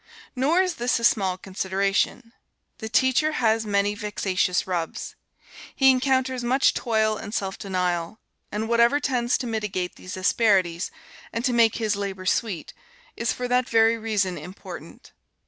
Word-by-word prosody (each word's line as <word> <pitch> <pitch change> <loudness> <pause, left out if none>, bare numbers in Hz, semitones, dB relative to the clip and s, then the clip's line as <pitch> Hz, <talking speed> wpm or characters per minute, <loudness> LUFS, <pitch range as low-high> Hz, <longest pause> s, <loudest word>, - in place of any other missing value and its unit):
Nor 305 +9 +3
is 365 -2 -1
this 240 0 +1
a - - -7
small 190 -5 +2
consideration. 195 +5 -1 0.5
The 220 - -5
teacher 260 +6 +2
has 225 -4 +1
many 200 0 +1
vexatious 195 -4 -1
rubs. 175 -3 -4 0.6
He 270 -1 +6
encounters 260 -1 +1
much 260 +3 +3
toil 220 -2 +1
and 210 +2 -7
self 195 -1 -3
denial; 180 0 -2 0.3
and 215 +2 -2
whatever 235 +4 +4
tends 250 -4 0
to 255 - -5
mitigate 210 -6 -3
these 185 - -8
asperities, 185 -3 +2 0.4
and 230 +2 -3
to 250 - +1
make 230 -2 +4
his 215 -3 0
labor 195 -2 -5
sweet, 185 -3 -1 0.4
is 230 - -1
for 250 - -3
that 250 0 +1
very 225 0 +4
reason 205 -6 -1
important. 180 +6 -10
220 Hz, 145 wpm, -24 LUFS, 190-240 Hz, 0.6 s, He